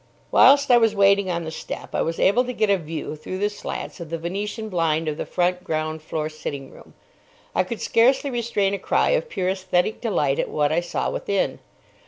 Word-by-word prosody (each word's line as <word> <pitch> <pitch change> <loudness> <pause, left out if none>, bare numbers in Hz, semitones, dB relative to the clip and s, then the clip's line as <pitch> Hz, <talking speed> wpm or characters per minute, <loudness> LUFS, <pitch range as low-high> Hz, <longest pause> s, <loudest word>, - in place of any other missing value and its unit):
Whilst 280 -1 +6
I 240 - +7
was 225 -2 +2
waiting 200 -1 +4
on 170 -1 -1
the 160 - -5
step, - - -7
I - - +1
was 165 0 -2
able 225 +6 +4
to 250 - -4
get 215 -3 +1
a 200 - +4
view 155 -1 -5
through 155 +5 -6
the 205 +2 0
slats 205 - -6
of 170 -3 -7
the 165 - -3
Venetian 205 +6 -4
blind 165 -4 0
of 155 - -1
the - - -5
front 180 0 0
ground 155 -1 -2
floor 155 0 -3
sitting 140 -3 -6
room. - - -16 0.6
I - - +2
could 220 +4 -6
scarcely 260 +4 +3
restrain 230 -5 0
a 200 - -2
cry - - +1
of - - 0
pure 185 -2 -1
aesthetic 185 +1 0
delight 150 - 0
at - - -1
what 150 -1 +1
I 160 - +2
saw 175 - -2
within. 200 -1 -1
185 Hz, 215 wpm, -23 LUFS, 160-215 Hz, 0.6 s, I